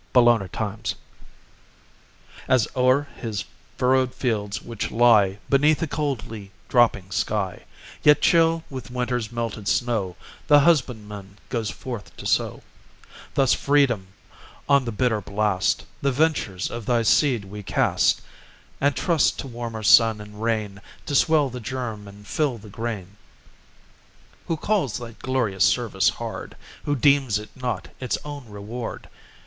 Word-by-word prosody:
SEED 125 -1 +7
TIME 120 -3 +5
AND 95 -2 -9
HARVEST 110 0 -3 1.5
As 125 -4 +3
o'er 130 +2 +3
his 110 -4 -4 0.3
furrowed 130 0 +2
fields 105 -5 -1
which 115 -3 -5
lie 110 -5 +4
Beneath 145 +3 +3
a - - -1
coldly 120 -9 -4 0.2
dropping 110 -6 +2
sky, 105 -4 -2 0.4
Yet 150 -1 +6
chill 165 -1 +3
with 130 -5 -7
winter's 125 -2 -2
melted 115 -3 -4
snow, 110 -7 0 0.3
The 145 -1 +7
husbandman 105 - 0
goes 115 -4 -2
forth 120 -3 -7
to - - -9
sow, - - 0 0.7
Thus, 135 -2 +4
Freedom, 135 -9 +2 0.6
on 140 -2 +4
the 115 - -2
bitter 110 0 0
blast 100 -2 0 0.2
The 140 - +2
ventures 130 - 0
of 115 -2 -6
thy 120 -2 +2
seed 120 -2 +3
we 105 +2 -8
cast, 95 - +2 0.6
And 140 -1 +2
trust 170 -5 +2
to - - -5
warmer 115 -3 -6
sun 110 +1 +6
and 105 0 -10
rain 110 -3 -2 0.2
To - - -4
swell 150 -1 +3
the 125 - -6
germ, 115 -3 -5
and 100 +1 -13
fill 140 0 -1
the 105 0 -13
grain. 105 -3 -5 1.3
Who 165 - -1
calls 180 - 0
thy 120 -2 -7
glorious 115 -8 0
service - - +2
hard? - - -6 0.3
Who 145 - +1
deems 140 -4 +3
it 105 0 -10
not 125 -7 -4
its 130 - -1
own 145 -5 -8
reward? 105 +4 -6
120 Hz, 140 wpm, -24 LUFS, 105-135 Hz, 1.5 s, SEED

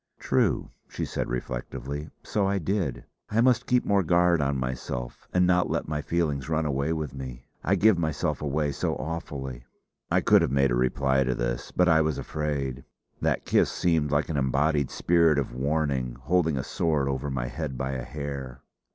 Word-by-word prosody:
"True," - - +1 0.2
she - - -3
said - - -3
reflectively. 65 +4 -4
"So 100 -2 0
I 100 0 +1
did. 90 -7 -2 0.2
I 110 - +1
must 120 0 +3
keep 125 0 +2
more 100 -1 +3
guard 85 -1 +3
on 70 -1 0
myself 65 -1 -4
and 90 0 +3
not 90 0 +3
let - - -1
my 75 0 -2
feelings 75 -4 -1
run 80 0 +1
away 70 +1 0
with 75 -5 -3
me. 65 -3 -7 0.2
I 100 - +3
give 100 -1 +4
myself 80 -3 -1
away 75 0 0
so - - -1
awfully." 70 -6 -5 0.5
I - - +3
could - - +5
have - - +1
made 70 0 +2
a - - +2
reply 65 +2 +2
to 65 -1 0
this, - - -2
but 90 - +3
I 80 -2 +5
was 80 -1 0
afraid. 70 -4 -3 0.4
That - - 0
kiss - - +3
seemed 80 -4 +1
like 75 +2 +1
an 80 - -1
embodied 70 +2 +1
spirit 85 -3 +3
of 70 -4 -1
warning, 70 -2 -1
holding 80 -4 +2
a 65 - -1
sword 75 -5 0
over 70 +1 -2
my 65 -3 -2
head 65 +1 -4
by 65 +1 -2
a 65 -2 -3
hair. 70 -2 -6
75 Hz, 185 wpm, -27 LUFS, 65-80 Hz, 0.5 s, could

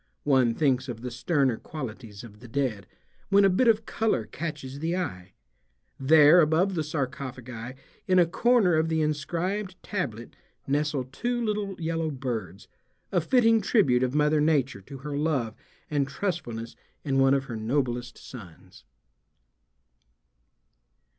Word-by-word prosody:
One 130 -5 +3
thinks 130 -4 +1
of 115 -2 -6
the 125 0 -5
sterner 125 0 +1
qualities 115 -8 -8
of 105 -3 -13
the 120 - -12
dead, 110 -6 -2 0.4
when 200 0 +5
a 195 - +4
bit 240 +7 +2
of 225 -1 +3
color 215 - 0
catches 140 +2 -6
the 165 +3 -1
eye. 95 - -5 0.7
There 150 +4 +7
above 165 +5 +2
the 165 - -1
sarcophagi 130 -4 -5 0.3
in 185 -1 +3
a 175 - +6
corner 220 +1 +3
of 160 +1 +2
the 160 -1 +1
inscribed 175 +6 -2
tablet 120 - -4 0.3
nestle 145 -1 0
two 240 - -3
little 205 -3 -2
yellow 165 -1 -1
birds, 115 - -5 0.4
a 180 - +2
fitting 230 +2 +4
tribute 180 - +3
of 130 +1 0
Mother 150 0 +3
Nature 140 -8 +1
to 135 +8 -10
her 145 +2 -6
love 140 -7 -1 0.3
and 145 -2 0
trustfulness 135 - -4 0.3
in 135 -2 0
one 135 +1 +5
of 135 - 0
her 120 - -6
noblest 120 +1 -2
sons. 95 -10 -13
145 Hz, 140 wpm, -27 LUFS, 125-170 Hz, 0.7 s, There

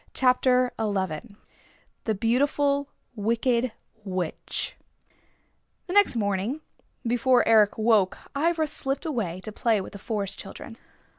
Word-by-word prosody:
CHAPTER 255 -1 +3
XI 200 -1 -2 0.7
THE 220 - +1
BEAUTIFUL 280 +5 +1 0.3
WICKED 235 +3 +1 0.3
WITCH 185 -4 -3 1.1
The 360 - -5
next 410 -8 +5
morning 205 +6 -1 0.4
before 245 +1 +3
Eric 215 -2 +5
woke 215 -4 +3 0.2
Ivra 320 +2 +2
slipped 275 0 -3
away 215 - -2
to 215 - -7
play 220 0 +1
with 190 - -7
the 200 - -8
Forest 205 -2 -3
Children. 225 +3 -9
230 Hz, 115 wpm, -26 LUFS, 205-260 Hz, 1.1 s, next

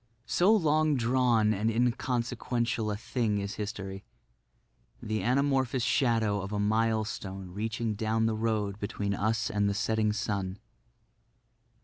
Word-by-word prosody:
So 180 - +3
long 155 -6 +3
drawn 120 -3 +3
and 110 +2 0
inconsequential 120 -1 0
a 105 - -2
thing 115 -1 -1
is 100 0 -3
history—the 95 - -8
anamorphous 130 0 +1
shadow 115 -6 +2
of 95 +2 -6
a 105 - -1
milestone 105 -3 -1
reaching 110 +3 -2
down 110 +2 0
the 115 - +1
road 110 -2 -1
between 100 -1 -2
us 110 +2 0
and 100 -1 +1
the 100 - -1
setting 110 0 +1
sun. 100 -3 -2
110 Hz, 120 wpm, -29 LUFS, 100-120 Hz, -, So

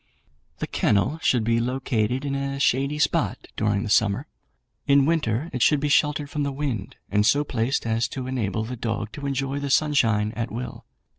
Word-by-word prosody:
"The - - -3
kennel 120 +10 +1
should 125 -7 +2
be 115 +1 +2
located 125 0 -1
in 140 - -2
a 140 0 -2
shady 140 +2 +1
spot 150 - 0
during 105 -1 0
the 110 - -4
summer; 105 -2 +2 0.6
in 140 -1 +5
winter 150 -2 0
it 125 - -3
should 150 +3 +4
be 145 +1 -1
sheltered 150 0 +2
from 150 +1 -3
the 140 -1 0
wind, 135 -8 -3 0.2
and 105 +1 +3
so 145 +7 +3
placed 125 -3 -1
as 115 +1 +1
to 130 +2 -6
enable 115 -4 -2
the 125 +3 -5
dog 110 -2 -3
to 140 +5 -5
enjoy 135 0 -2
the 140 0 -3
sunshine 115 -8 +2
at 115 0 -3
will. 120 +3 -6
130 Hz, 190 wpm, -24 LUFS, 110-140 Hz, 0.6 s, in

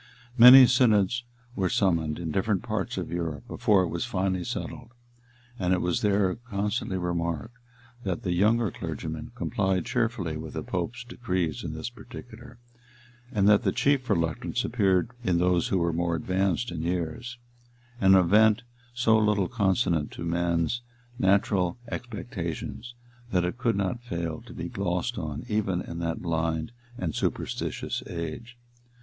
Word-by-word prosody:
Many 125 +2 +11
synods 120 -2 +3 0.3
were 95 -2 0
summoned 80 -6 +1
in 85 -2 -4
different 100 +2 0
parts - - -3
of - - -4
Europe 80 -6 -4
before 100 -3 +3
it 90 - -2
was 85 - -2
finally 95 -5 -1
settled; 115 - -6 0.7
and 90 -1 +2
it - - -1
was 90 -1 0
there 100 -3 +2
constantly 105 -3 -2
remarked, 85 +4 -2 0.5
that 95 -4 -3
the 90 - -1
younger 105 +3 +2
clergymen 80 -1 -5
complied 95 0 0
cheerfully 115 -10 -1
with 80 0 -8
the - - -3
pope's 105 +7 -3
decrees 95 - -2
in - - -4
this 80 +9 -5
particular, 120 +1 -12 0.7
and 100 -5 +2
that 105 -1 +6
the - - +1
chief 140 -3 +1
reluctance 85 -6 0
appeared 95 -3 +2
in 90 -6 +2
those 90 0 +2
who 95 - +1
were 85 -1 +1
more 85 0 0
advanced 95 +6 0
in 85 -2 -4
years; 90 +8 -3 0.6
an 95 0 +6
event 105 +5 +5 0.3
so 115 -3 +4
little 105 -3 +2
consonant 95 -8 +1
to - - -6
men's 85 +5 0 0.4
natural 95 -3 +2
expectations, 120 0 -5 0.4
that 90 -2 +2
it 100 +8 -4
could 120 -3 +1
not 100 +4 -1
fail 85 -8 -4
to - - -10
be - - -4
glossed 90 +6 -2
on 75 0 -5
even 105 -5 0
in 85 -2 -6
that 85 0 -3
blind 80 0 -1 0.3
and 80 -4 -2
superstitious - - -2
age. 90 +9 -6
95 Hz, 150 wpm, -27 LUFS, 85-115 Hz, 0.7 s, Many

